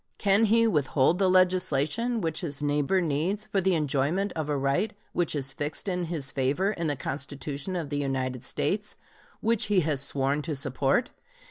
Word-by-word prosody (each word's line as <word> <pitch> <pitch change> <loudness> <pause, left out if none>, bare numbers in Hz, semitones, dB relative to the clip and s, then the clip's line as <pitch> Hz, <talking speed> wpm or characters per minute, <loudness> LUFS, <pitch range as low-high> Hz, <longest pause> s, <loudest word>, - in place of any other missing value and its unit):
Can 200 +2 +3
he 230 +2 +4
withhold 150 -3 +2
the 190 -2 +3
legislation 185 - +2
which 160 -2 -1
his 145 -6 -1
neighbor 150 +5 +1
needs 175 +7 -1
for 200 -2 0
the 190 -1 +2
enjoyment 155 +6 0
of 155 -2 -3
a 145 - +1
right 140 +10 0 0.2
which 175 -3 0
is 135 -2 -2
fixed 145 +7 -4
in 180 -2 -1
his 155 -5 -3
favor 140 +10 +1
in 170 -6 -3
the 145 - 0
Constitution 140 +5 -4
of 160 -5 -4
the 145 - -1
United 130 -3 -2
States, - - -1 0.5
which 230 -1 +1
he 200 -3 +3
has 150 -4 0
sworn 140 +1 0
to 155 0 -3
support? 135 - 0
155 Hz, 175 wpm, -27 LUFS, 140-190 Hz, 0.5 s, he